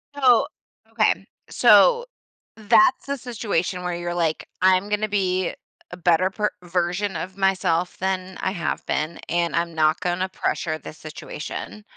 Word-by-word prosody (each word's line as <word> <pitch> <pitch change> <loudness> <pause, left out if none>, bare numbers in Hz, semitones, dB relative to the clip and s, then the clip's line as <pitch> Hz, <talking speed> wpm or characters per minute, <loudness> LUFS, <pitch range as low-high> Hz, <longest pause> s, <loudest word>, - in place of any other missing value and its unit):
Oh, 260 -3 +4 0.4
okay. 215 -3 +1 0.2
So, 245 - +5 0.5
that's 220 +4 +3
the 280 0 -2
situation 205 -7 -2
where 180 -1 -2
you're, 175 0 -4
like, 165 -2 -1
"I'm 185 +2 +3
gonna 210 +1 0
be 185 -3 0
a - - -9 0.4
a 175 - -7
better 180 +2 +2
per 210 +2 0
version 180 +2 -1
of 185 +4 -5
myself 185 -3 +1
than 190 0 -2
I - - 0
have 170 -4 -3
been, 155 +2 -2
and 170 0 0
I'm 170 -1 -1
not 155 +1 +2
gonna 180 0 -1
pressure 165 -3 -2
this 155 - -10
situation." 155 +6 -7
185 Hz, 150 wpm, -23 LUFS, 175-210 Hz, 0.5 s, So